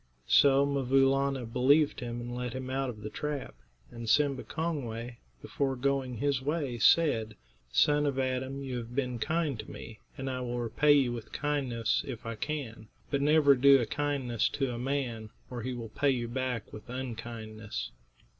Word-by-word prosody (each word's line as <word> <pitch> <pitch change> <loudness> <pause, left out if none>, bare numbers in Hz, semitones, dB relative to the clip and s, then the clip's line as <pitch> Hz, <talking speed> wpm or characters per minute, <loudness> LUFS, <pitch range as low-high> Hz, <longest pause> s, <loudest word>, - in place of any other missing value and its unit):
So 140 - +5
'Mvoo 135 -1 +3
Laana 135 -2 0
believed 135 +6 +3
him 120 -1 -4
and 120 0 -5
let 125 -1 -3
him 130 0 -5
out 135 0 -1
of 110 -3 -8
the 110 - -5
trap, 150 -2 -4 0.4
and 115 -2 -6
Simba 140 +1 +3
Kongway, 125 -8 -4 0.2
before 135 -2 -1
going 135 -1 -1
his 140 +1 0
way, 140 -4 -2
said: 115 -8 +4 0.4
"Son 145 - +3
of 140 -2 -1
Adam, 130 +1 -2
you 130 -2 -3
have 120 0 -7
been 125 -3 -1
kind 155 -2 0
to - - -7
me, 110 -2 -9 0.2
and 135 - -4
I 130 -1 -2
will 120 -1 -3
repay 120 +5 +3
you 135 -4 +3
with 115 -2 -7
kindness 130 -6 0
if 120 -4 -6
I 115 - -3
can; 115 -3 -5 0.2
but 140 -1 +1
never 150 -1 +6
do 135 +1 +6
a 120 - 0
kindness 135 -5 0
to 135 -3 -1
a 120 - -5
man, 125 -4 -2 0.2
or 120 -1 -4
he 130 +2 -3
will 115 -2 -6
pay 140 +6 +1
you 120 -3 0
back 125 -2 -3
with 105 +2 -10
unkindness." 110 - -6
130 Hz, 180 wpm, -30 LUFS, 120-140 Hz, 0.4 s, never